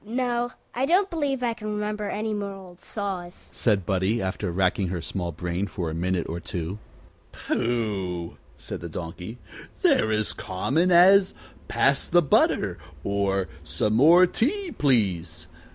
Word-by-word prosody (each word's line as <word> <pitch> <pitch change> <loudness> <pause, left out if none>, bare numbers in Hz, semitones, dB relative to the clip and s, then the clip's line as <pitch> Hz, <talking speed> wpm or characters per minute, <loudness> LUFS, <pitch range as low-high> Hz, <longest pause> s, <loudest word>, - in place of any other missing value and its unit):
"No; 240 +2 -1 0.2
I 260 +3 0
don't 380 +4 +3
believe 280 -6 -1
I 235 -1 +1
can 215 -1 -6
remember 210 0 -2
any 215 +1 -2
more 200 -1 -3
old 185 -2 -13
saws," 190 -4 -5
said 100 -6 +1
Buddie, 95 +5 +1
after 95 -1 -2
racking 95 +2 +1
her 90 0 -3
small 85 +1 -3
brain 90 +4 -3
for 90 -4 -4
a - - -5
minute 90 +1 -1
or 85 +2 -4
two. 85 +3 -5 0.5
"Pooh!" 100 -8 -2 0.2
said - - -7
the 85 - -6
Donkey. 90 +7 -7 0.5
"They're 110 - +4
as 110 -1 0
common 140 - 0
as, 190 +3 +6 0.3
Pass 140 0 +2
the 175 0 +4
butter, 100 - +2 0.2
or, 100 -1 0 0.2
Some 105 +6 -1
more 165 +10 +7
tea, 345 - -1
please. 90 - 0
115 Hz, 150 wpm, -25 LUFS, -, 0.5 s, more